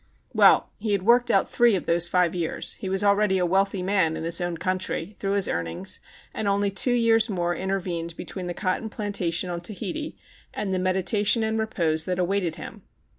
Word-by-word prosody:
Well, - - +5
he 210 -1 -1
had 195 -2 0
worked 240 +3 +4
out 195 -4 +3
three 240 -3 +3
of 185 - -3
those 170 +1 +1
five 180 -2 +2
years. 170 -3 -2
He 190 - -6
was 195 +1 0
already 200 -1 +3
a 180 - +1
wealthy 195 +1 +1
man 185 -4 +1
(in - - -5
his 170 +2 0
own 175 -1 -2
country), 185 +1 -2
through 195 0 -1
his 200 -1 +3
earnings, 85 0 -4 0.3
and 215 - -3
only 200 0 +1
two 245 +5 +2
years 230 -1 +3
more 175 -3 -1
intervened 175 -3 -3
between 185 -2 -6
the 175 - -4
cotton 205 +3 -2
plantation 185 -5 -2
on 170 - -3
Tahiti 215 - -5 0.4
and 200 -2 -2
the 185 - 0
meditation 190 +4 +2
and 220 0 -1
re 220 - -1
pose 160 -6 0
that 180 -1 -2
awaited 180 -2 0
him. - - -9
190 Hz, 200 wpm, -25 LUFS, 175-205 Hz, 0.4 s, Well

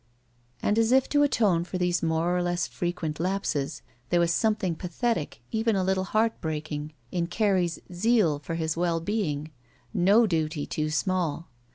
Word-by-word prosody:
And 210 +2 +2
as 225 +1 +3
if 265 0 +4
to 290 - +3
atone 210 -11 +3
for 180 +1 -4
these 180 -1 +1
more 165 +2 +1
or 180 - +1
less 175 0 0
frequent 175 -3 -3
lapses, 160 -6 -1 0.3
there 175 - +3
was 170 -1 +3
something 210 -4 +1
pathetic, 175 - -2
even 225 0 +1
a 190 - +1
little 190 0 +1
heartbreaking, 155 -8 -2 0.2
in 170 -1 -1
Carrie's 180 -3 +1 0.2
zeal 180 -5 +2
for 160 +3 -5
his 160 -1 -1
well 170 -1 +1
being. 160 -6 -2 0.4
No 205 +6 +5
duty 160 -5 -1
too 155 0 -2
small. 170 -1 -1
175 Hz, 160 wpm, -27 LUFS, 160-205 Hz, 0.4 s, No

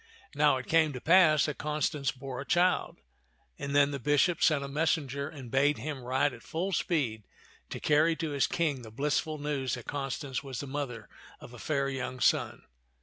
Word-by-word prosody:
Now 145 -2 +3
it 130 - -6
came 160 -2 +3
to 125 - -5
pass 160 -2 +5
that 150 - -4
Constance 150 -1 -1
bore 130 -1 -7
a - - -4
child, 175 +5 +1 0.6
and 140 0 -3
then 145 0 +5
the 140 - -4
bishop 145 +6 +2
sent 150 -3 +3
a - - -4
messenger 140 -1 -1
and 135 -7 -10
bade 145 +2 +3
him 150 -4 -5
ride 130 +4 +1
at - - -11
full 180 +5 -3
speed 135 - 0 0.5
to - - -5
carry 155 +2 +3
to 160 -2 -3
his 140 -1 +1
King 150 -6 -1
the 115 - -10
blissful 150 +6 -1
news 145 -3 -2
that 125 - -9
Constance 135 -1 -4
was 135 -2 -6
the - - -4
mother 135 -5 -5 0.3
of 120 - -12
a 120 - -11
fair 140 0 -1
young 130 -1 -4
son. - - +1
145 Hz, 195 wpm, -30 LUFS, 135-155 Hz, 0.6 s, pass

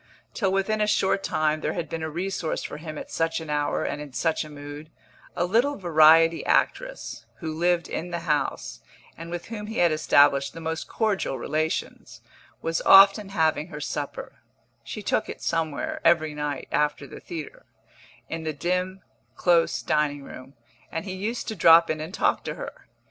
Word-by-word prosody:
Till 195 -4 0
within 195 +3 0
a 210 - +2
short 195 -1 +2
time 155 0 0
there - - -1
had 170 - -3
been 165 - -5
a 160 - -3
resource 175 0 -3
for - - -6
him 155 -1 -7
at - - -8
such 165 0 0
an 160 -2 -6
hour 145 0 0
and 145 - -3
in 145 -3 -9
such 160 +8 0
a 155 - -10
mood; 145 +1 -9 0.5
a 175 - +1
little 240 +10 +2
variety 165 -1 +5
actress, - - -1
who 160 -3 -5
lived 170 +1 +1
in 175 - -4
the 170 -1 -4
house, 150 - -2 0.4
and 165 +1 -9
with 175 +3 -6
whom 210 -2 -6
he 220 - -6
had 175 -2 +4
established 145 -2 +3
the - - -7
most 160 0 -4
cordial 205 - -1
relations, 155 +5 -3 0.4
was 165 0 -1
often 195 +1 +7
having 160 -4 +1
her 150 -4 -8
supper 145 -1 -5 0.4
(she - - -7
took - - 0
it - - -6
somewhere, 160 -3 -2
every 165 -2 +3
night, 150 -2 -4
after 150 -1 0
the - - -10
theatre) 160 -3 -8 0.6
in 165 - -4
the 155 -1 -2
dim, 180 +5 -2 0.3
close 170 -2 +2
dining 150 -2 0
room, 130 0 -11 0.4
and 165 - -4
he 190 - -5
used 215 +6 -4
to 220 - -3
drop 165 -2 +6
in 155 -1 -3
and 165 +6 -6
talk - - +1
to - - -4
her. - - -9
165 Hz, 180 wpm, -25 LUFS, 150-185 Hz, 0.6 s, often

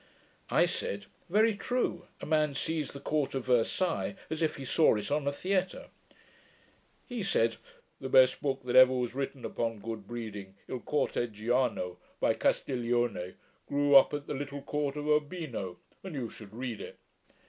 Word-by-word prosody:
I - - +4
said, 100 0 -3 0.2
'Very 215 +4 +4
true: 205 -5 -2
a - - -5
man 150 -2 +2
sees 155 0 -1
the 140 - -8
court 145 -1 -1
of 130 - -2
Versailles, 130 +10 +1 0.2
as 160 +1 -2
if 160 - +1
he 135 - -7
saw 155 -1 +4
it 105 +3 -4
on 145 -1 0
a - - +3
theatre.' 185 +4 -1 1.2
He 245 -4 -4
said, 115 - +2 0.4
'The 130 - -5
best 130 -1 +6
book 135 -2 -1
that 125 -1 -2
ever 130 0 +9
was 125 -2 -1
written 135 -1 -4
upon 115 -1 -2
good 110 -1 -6
breeding, 105 -5 -6
Il 130 - -4
Corteggiano, 120 -7 0 0.2
by - - +3
Castiglione, 120 -7 0 0.3
grew 145 0 +3
up 135 - +8
at 145 -1 -5
the - - -4
little 140 0 -5
court 145 -1 -2
of 150 0 -4
Urbino, 150 - -1 0.3
and 190 -5 -6
you 120 -5 -3
should 105 -3 -11
read 120 -1 -5
it.' - - -9
135 Hz, 165 wpm, -30 LUFS, 115-150 Hz, 1.2 s, ever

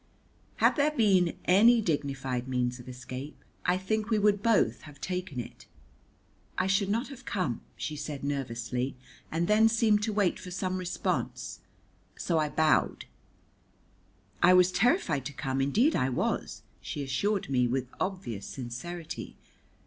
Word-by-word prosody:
Had - - +3
there 290 +1 +4
been 195 - +3
any 230 +6 +6
dignified 135 - -2
means 125 -1 -1
of 125 +1 -10
escape, 130 +3 -7 0.3
I 180 +1 +3
think 215 +3 -1
we 220 - +3
would 205 -1 +3
both 230 0 +2
have 145 -2 -13
taken 180 -7 -4
it. 120 - -8 0.9
"I - - +2
should 195 +1 +2
not 230 +6 0
have 265 -2 -10
come," 185 - -2 0.2
she 155 - -4
said 145 -1 -5
nervously, 125 -2 -2 0.4
and 165 +2 0
then 220 +1 +5
seemed 220 -2 +3
to 215 +1 -1
wait 205 -3 +1
for 180 - -8
some 185 +1 -2
response, 180 0 -3 0.6
so 165 -2 0
I 155 -1 +1
bowed. 155 +1 +2 1.4
"I 185 - +7
was 180 0 +5
terrified 185 - +2
to 145 - -8
come, 135 -1 -2
indeed 225 - +3
I 130 - +1
was," 125 - -2 0.2
she 145 - -4
assured 180 +7 -1
me 125 -2 +3
with 130 +1 -1
obvious 180 - -3
sincerity. 140 +7 -6
175 Hz, 150 wpm, -29 LUFS, 135-205 Hz, 1.4 s, I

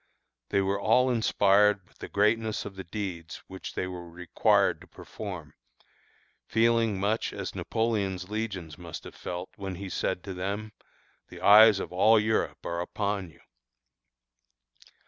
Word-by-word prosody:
They 100 - +2
were 100 +1 -1
all 125 +5 +4
inspired 105 -3 +3
with - - -28
the - - -6
greatness 110 +1 +1
of 100 - -8
the 95 - -7
deeds 90 -2 -6
which 95 0 -9
they - - -1
were 90 -2 -7
required 90 +1 +1
to - - -14
perform, - - -8 0.9
feeling 115 -2 +2
much 105 +3 0
as - - -5
Napoleon's 100 -5 -1
legions 95 -8 -5
must 85 -2 -8
have - - -10
felt, 90 +1 -6
when 95 -2 -5
he 95 +1 -7
said 90 - -2
to 95 - -6
them: 100 +4 -4 0.6
"The - - -11
eyes 105 0 +8
of - - -6
all 110 +5 +5
Europe 110 +1 -1
are 85 0 -2
upon 100 0 -3
you." 80 - -21
100 Hz, 145 wpm, -28 LUFS, 90-110 Hz, 0.9 s, eyes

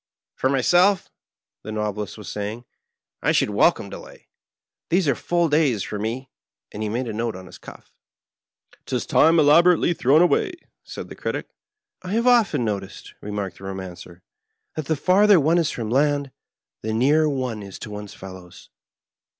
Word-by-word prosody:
"For 130 - 0
myself," 175 +8 +3 0.5
the 110 - -7
Novelist 105 -1 -3
was 105 - -10
saying, 105 +4 -5 0.6
"I - - +2
should - - +2
wel - - +5
come - - -9
delay; - - -12 0.6
these 175 -1 +2
are 140 - +4
full 170 +6 0
days 145 - +2
for 105 - -5
me," 120 +5 -4 0.4
and 105 - -7
he 110 - -2
made 120 +4 -2
a 110 - -4
note 115 0 -2
on 95 0 -9
his - - -13
cufE. - - -13 0.5
" - - -33
'Tis - - -2
time 165 +2 +4
elaborately 170 +4 +5
thrown 150 +2 +4
away," 180 - +2 0.3
said - - -8
the - - -9
Critic. - - -4 0.3
" 420 0 -65
I 185 +2 -5
have 230 +2 +1
often 220 - +3
noticed," 100 -2 -5
remarked 100 -3 -5
the 95 - -10
Komancer, 90 -2 -8 0.5
"that 155 - -4
the 160 - +1
farther 190 +5 +5
one 160 +4 +3
is 165 - +1
from 115 -2 -4
land, 140 +1 +1 0.5
the 110 0 -3
nearer 150 +7 +3
one 130 -6 -3
is 100 -2 -9
to 105 - -8
one's 105 -1 -8
fellows. 95 -2 -12
130 Hz, 175 wpm, -23 LUFS, 105-160 Hz, 0.6 s, wel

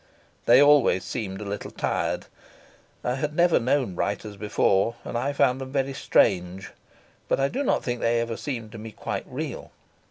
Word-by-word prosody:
They 120 +2 +8
always 145 -10 +5
seemed 95 0 -4
a - - -5
little 100 +1 -5
tired. - - -2 0.8
I 125 - 0
had 150 +3 -3
never 175 0 +4
known 125 -3 +1
writers 100 +2 -3
before, 105 +1 +1
and - - -6
I 130 +4 0
found 130 -2 +2
them 130 0 -6
very 135 -1 0
strange, 95 -6 +1 0.6
but - - +1
I 135 - +3
do 270 - -2
not 280 - +1
think 120 -1 -2
they 115 0 +2
ever 115 -1 -2
seemed 115 -6 -5
to 115 - -9
me 110 0 -8
quite - - -5
real. - - -5
120 Hz, 180 wpm, -25 LUFS, 105-135 Hz, 0.8 s, They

